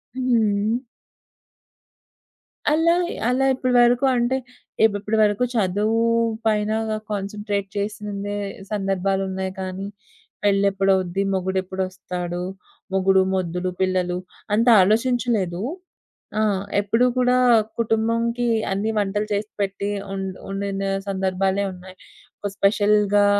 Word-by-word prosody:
హ్మ్. 225 -4 +1 1.9
అలా, 325 +2 +4 0.4
అలా 260 +2 +2
ఇప్పటివరకు 245 0 +3
అంటే 240 +2 +1 0.5
ఇప్ 220 -2 +4
ఇప్పటి 215 +2 -1
వరకు 205 +3 +2
చదువు 215 +1 +1 0.4
పైన 215 -1 +1 0.4
కాన్సంట్రేట్ 205 0 -3
చేసిందే 205 0 -3 0.3
సందర్భాలున్నాయి 195 -1 -1
కానీ, 190 +1 -4 0.6
పెళ్ళెప్పుడవుద్ది, 195 -2 +2
మొగుడెప్పుడొస్తాడు, 185 -1 -3 0.5
మొగుడు, 190 0 +4
మొద్దులు, 180 0 -2
పిల్లలు 185 -1 +1 0.4
అంత 230 +3 +2
ఆలోచించలేదు. 215 -3 +1 0.8
ఆ! - - +3 0.4
ఎప్పుడూ 225 +4 +2
కూడా 250 0 +3 0.4
కుటుంబంకి 230 +2 +1 0.2
అన్నీ 200 +3 0
వంటలు 205 +1 -1
చేసి 205 +1 -2
పెట్టి 200 0 -2 0.2
ఉండ్ 190 -1 -4
ఉండిన 195 0 -3 0.3
సందర్భాలే 190 +1 0
ఉన్నాయి. 185 +1 -13 0.4
ఒక 205 - -3
స్పెషల్‌గా 205 0 +3
200 Hz, 90 wpm, -22 LUFS, 190-220 Hz, 1.9 s, అలా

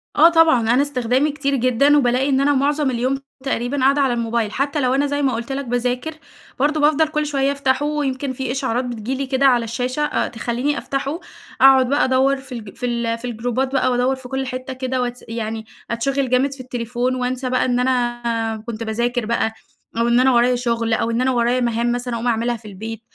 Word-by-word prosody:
آه 325 +3 +7
طبعًا، 325 -7 +4
أنا 265 - +4
استخدامي 265 +1 +1
كتير 280 -1 -1
جدًا، 255 +4 +3
وبالاقي 260 +1 +2
إن 270 0 +2
أنا 290 +1 +3
معظم 285 +1 +1
اليوم 255 +3 0 0.3
تقريبًا 270 0 -2
قاعدة 275 +2 +3
على 265 -3 +2
الموبايل، 230 -2 -1
حتى 280 +4 -1
لو 255 0 +2
أنا 285 +1 +2
زي 285 +1 -1
ما 265 -3 +1
قُلت 235 +3 -4
لك 275 0 -3
باذاكر، 245 +5 -2 0.5
برضه 300 +2 +1
بافضل 305 +1 +4
كل 305 -1 -1
شوية 280 -1 0
أفتحه 280 0 0
ويمكن 280 -3 -2
في 260 -1 -3
إشعارات 260 -2 -1
بتيجي 240 +1 -4
لي 275 - -2
كده 270 +1 +1
على 245 -3 +4
الشاشة، 250 +5 -3
أ - - -1
تخليني 245 +5 -2
أفتحه، 275 +4 -3 0.4
أقعد 265 -1 +6
بقى 285 - +2
أدوّر 265 +1 +2
في 265 -1 -14
الج 220 -5 -8
في 245 - -4
ال 235 -1 -1
في 240 - -9
الجروبات 245 +3 -2
بقى 255 -1 +2
وادوّر 250 +2 +1
في 260 -1 -11
كل 265 +1 -3
حتّة 255 +1 -5
كده 255 0 -2
واتس 245 0 -4
يعني 220 -1 -4 0.3
أتشِغل 265 +3 -1
جامد 265 +2 +2
في 275 - -14
التليفون 245 0 -2
وانسى 255 0 -2
بقى 255 - +1
إن 245 -1 +1
أنا 240 -3 -1
كنت 230 -1 -4
باذاكر 235 +2 -1
بقى، 225 0 0 0.4
أو 230 +1 +2
إن 240 +1 +4
أنا 260 +1 +4
ورايا 245 +1 +4
شغل، 235 -2 -1
أو 230 +1 0
إن 235 +2 0
أنا 260 0 +2
ورايا 240 +1 +1
مهام 235 0 0
مثلًا 245 0 -3
أقوم 235 +2 -3
أعملها 235 +1 0
في 215 -1 -14
البيت، 220 +3 -7
255 Hz, 215 wpm, -20 LUFS, 235-275 Hz, 0.5 s, آه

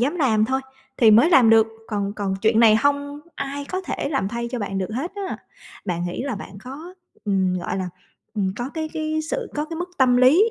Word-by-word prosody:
dám 285 +8 +1
làm 225 -8 +3
thôi 265 +3 0 0.4
thì 225 -3 +6
mới 235 +11 +6
làm 250 -8 +6
được, 225 -1 +6 0.2
còn 200 -2 -2
còn 200 -2 -2
chuyện 225 +1 +4
này 220 -2 +7
hông 285 +3 0
ai 280 +1 -4
có 370 +6 -3
thể 360 - -3
làm 270 -10 0
thay 235 +1 -3
cho 250 - -3
bạn 195 -2 -3
được 190 +2 -3
hết 330 +8 -3
á. 400 -2 -4 0.5
Bạn 175 -2 -2
nghĩ 175 - -4
là 270 -4 -2
bạn 195 0 -9
có, 305 +8 -9 0.3
ừm, 190 -3 +1
gọi 175 - -3
là, 185 - -2 0.5
ừm, 190 -3 0
có 245 +2 -3
cái 315 -1 -2
cái 315 -1 -1
sự - - -2
có 295 0 -1
cái 325 +1 -7
mức 355 +2 -4
tâm 250 -2 +5
lý 315 - +5
250 Hz, 230 wpm, -23 LUFS, 210-305 Hz, 0.5 s, này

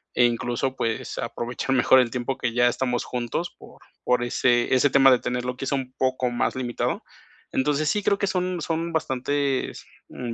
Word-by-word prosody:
e 125 - +5
incluso, 120 +2 -1
pues, 115 -3 -3
aprovechar 125 +3 -2
mejor 130 +1 +6
el 125 -2 +3
tiempo 125 +2 -2
que 125 -3 -1
ya 120 0 +4
estamos 125 -1 -1
juntos 125 +8 -3
por - - -15 0.2
por 125 -1 +2
ese 120 0 +2
ese 135 +3 +4
tema 135 -1 +6
de 125 - +5
tenerlo, 125 0 -3
que 135 - -4
es - - -3
un 130 -2 -3
poco 130 -1 +1
más 120 - 0
limitado. 125 -2 -2 0.5
Entonces, 150 +3 +1
sí 210 +4 0
creo 200 - +2
que 200 - 0
son 180 -1 -1
son 165 +2 -2
bastantes, 140 -2 -1 0.2
mm, 120 -2 -5
130 Hz, 185 wpm, -24 LUFS, 120-140 Hz, 0.5 s, mejor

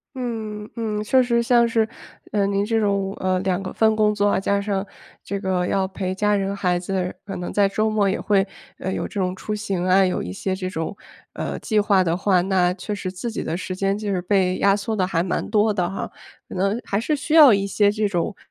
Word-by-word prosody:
嗯， 220 -4 -4
嗯， 215 -3 -2
确 260 +4 +4
实 235 -1 +1
像 235 0 +4
是， 225 -2 +2 0.4
嗯， 200 -1 +1
您 200 +1 +1
这 225 0 +1
种， 200 -2 0
呃， 185 -1 +1
两 190 0 0
个 190 - -5
份 220 -1 +3
工 210 -1 +3
作 205 0 +1
啊， 200 - +2
加 200 +1 +1
上 200 -1 -2 0.4
这 200 -1 -4
个 185 -2 0
要 190 -1 +1
陪 190 -1 -4
家 210 +1 +2
人 195 0 -1
孩 180 -2 0
子， 185 0 -2
可 195 -1 -6
能 180 -1 -5
在 200 -1 +3
周 215 +2 0
末 205 -2 +2
也 190 - -1
会， 200 -2 +2 0.3
呃， 190 - -3
有 - - -2
这 205 - -5
种 180 0 -1
出 210 +3 -5
行 195 -4 -2
啊， 185 +1 +5
有 185 - 0
一 90 - -5
些 190 - -2
这 185 -1 -4
种， 165 +1 -4 0.4
呃， - - -4
计 215 -2 +1
划 200 -3 +3
的 170 0 0
话， 190 -2 +3
那 180 -1 +2
确 210 +2 -5
实 185 -2 -4
自 190 +6 -5
己 - - -4
的 165 - -2
时 185 +1 -4
间 195 +1 0
就 210 -1 -3
是 185 - 0
被 185 0 +1
压 195 0 +4
缩 210 +2 -3
得 185 -3 +1
还 165 -3 0
蛮 180 0 -2
多 215 0 +3
的 180 -4 0
哈。 195 - -5 0.4
可 - - -9
能 195 +5 0
还 200 - -1
是 300 +6 0
需 300 +3 -1
要 290 -8 +9
一 200 0 +1
些 205 +1 +3
这 210 0 0
种， 180 +2 -1
200 Hz, 260 characters per minute, -22 LUFS, 185-210 Hz, 0.4 s, 要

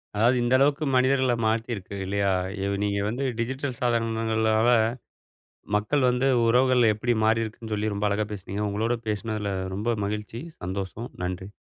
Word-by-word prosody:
அதாவது 115 +5 +4
இந்த 120 +1 +1
அளவுக்கு 145 +3 +2
மனிதர்கள 130 -1 +3
மாத்திருக்கு 110 -3 -2
இல்லையா? 100 0 +1 0.3
இத 100 - -1
நீங்க 100 0 0
வந்து 125 +5 -3 0.2
டிஜிட்டல் 130 +2 -2
சாதனங்களால, 115 -1 +1 1.1
மக்கள் 125 +6 +2
வந்து 125 +2 +1 0.2
உறவுகள்ல 125 -1 +4
எப்டி 120 +3 0
மாறியிருக்குன்னு 110 0 -1
சொல்லி 105 0 -1
ரொம்ப 100 +1 0
அழகா 105 +1 0
பேசினீங்க. 100 +1 -4
உங்களோட 110 +4 0
பேசுனதில 105 -1 -2 0.2
ரொம்ப 115 +4 0
மகிழ்ச்சி! 105 +2 -4 0.2
சந்தோஷம். 95 +5 -4
நன்றி. 95 +2 -4
110 Hz, 135 wpm, -26 LUFS, 105-120 Hz, 1.1 s, அதாவது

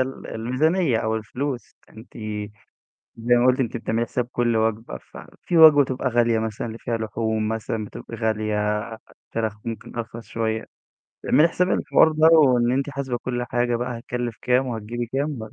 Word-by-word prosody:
ال 130 +1 -3
الميزانية 130 +5 +1
أو 110 0 -1
الفلوس. 125 +4 -5
أنتِ 110 +3 -14 1.0
زي 120 +2 +2
ما 120 +1 +3
قُلتِ 130 +1 +3
أنتِ 120 -2 -1
بتعملي 115 0 -1
حساب 125 +1 -2
كُل 120 -1 +1
وجبة، 110 +1 -1
ففي 175 - -5
وجبة 155 -3 +9
بتبقى 130 0 -2
غالية 120 -2 +2
مثلًا، 110 +1 -3
اللي 115 0 -7
فيها 115 -1 -2
لحوم 110 0 -2
مثلًا 110 0 -3
بتبقى 115 +2 -9
غالية، 110 -1 -1 0.4
الفراخ 110 -1 -4
ممكن 115 0 -6
أرخص 115 0 -6
شوية. 110 -1 -2 0.6
بتعملي 155 - +5
حساب 180 +2 0
الحوار 160 - +4
ده، 155 +1 +4
وإن 125 -7 +5
أنتِ 135 +2 0
حاسبة 135 -3 -3
كُل 120 0 -3
حاجة 120 0 0
بقى 120 0 -3
هتكلف 120 -2 -4
كام 125 +1 +2
وهتجيبي 120 +1 -4
كام؟ 135 +3 -2
120 Hz, 160 wpm, -23 LUFS, 110-130 Hz, 1.0 s, وجبة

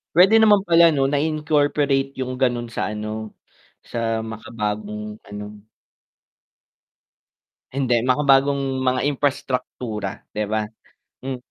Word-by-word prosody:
pwede 190 +5 +6
naman 210 -3 +5
pala, 170 -2 +6
'no, 140 -2 +1
na 145 - +2
i-incorporate 145 -3 +1
'yung 130 -1 -4
gano'n 120 -2 0
sa 105 - -2
ano 110 0 -5 0.5
sa 115 -1 -2
makabagong 105 -1 -5
ano. 105 +1 -9 2.0
Hindi, 125 -3 +1
makabagong 135 0 +2
mga 130 0 +1
imprastraktura, 125 -7 -2
'di 105 - -1
ba? 110 -1 0 0.5
Hmm. 130 0 -4
130 Hz, 105 wpm, -22 LUFS, 110-140 Hz, 2.0 s, pwede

